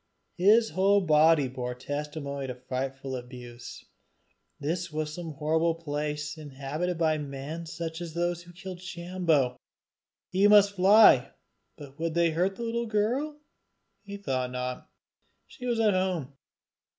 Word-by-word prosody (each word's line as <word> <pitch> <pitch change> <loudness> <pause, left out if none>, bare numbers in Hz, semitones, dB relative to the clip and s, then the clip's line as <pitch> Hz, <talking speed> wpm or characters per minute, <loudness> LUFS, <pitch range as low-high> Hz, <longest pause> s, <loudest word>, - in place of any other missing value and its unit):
His 215 +5 +5
whole 200 +2 +3
body 155 -3 +4
bore 125 -1 -5
testimony 140 +1 -5
to 125 - -5
frightful 130 +1 -4
abuse. 125 -1 -9 0.7
This 170 +3 -2
was 150 0 -3
some 165 -1 -6
horrible 160 +2 +1
place 150 -1 -4
inhabited 150 +4 -4
by 160 -2 +2
men 145 +4 -6
such 165 0 -5
as 170 -2 -7
those 175 0 -1
that 175 0 -15
killed 185 -1 -8
Sambo! 170 -6 0 0.7
He 190 +3 +4
must 205 -1 +6
fly. 195 - +6 0.4
But 140 0 -12
would 165 0 -2
they 170 -1 +3
hurt 180 +4 0
the 235 - -6
little 235 0 -2
girl? 250 +8 -1 0.6
He 200 -1 -8
thought 130 -9 -2
not 125 0 -5 0.6
she 250 - -9
was 235 -2 0
at 215 -3 +4
home. 180 -7 -1
165 Hz, 140 wpm, -28 LUFS, 140-185 Hz, 0.7 s, must